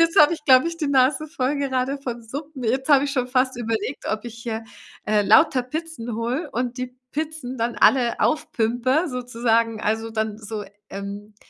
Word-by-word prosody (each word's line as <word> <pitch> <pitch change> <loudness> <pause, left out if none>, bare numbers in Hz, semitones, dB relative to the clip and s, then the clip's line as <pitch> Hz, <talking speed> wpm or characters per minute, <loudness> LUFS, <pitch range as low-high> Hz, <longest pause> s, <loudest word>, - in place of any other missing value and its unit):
Jetzt 330 -1 +4
habe 305 +2 +7
ich, 305 -2 -12
glaube 260 +3 +6
ich, 335 - -6
die 305 -4 -2
Nase 280 +3 +3
voll 290 -3 -1
gerade 270 0 -1
von 245 -3 -5
Suppen. 275 +2 -7
Jetzt 265 +5 0
habe 285 -1 +6
ich 280 - -2
schon 250 -3 0
fast 255 0 +1
überlegt, 230 +2 -3
ob 215 +2 -3
ich 235 -1 -7
hier, 225 -1 -4 0.4
äh, 210 -1 +2
lauter 220 +5 +5
Pizzen 280 -4 -5
hole 250 +8 -2
und 245 +1 -2
die 255 0 -5 0.2
Pizzen 300 -4 -4
dann 235 +1 -1
alle 245 -3 +4
aufpimpe 255 0 +1
sozusagen, 230 -3 0
also, 225 +2 -1
dann 220 -1 -2
so, 215 -1 -6 0.3
ähm, 200 +1 -7
250 Hz, 185 wpm, -23 LUFS, 225-280 Hz, 0.4 s, habe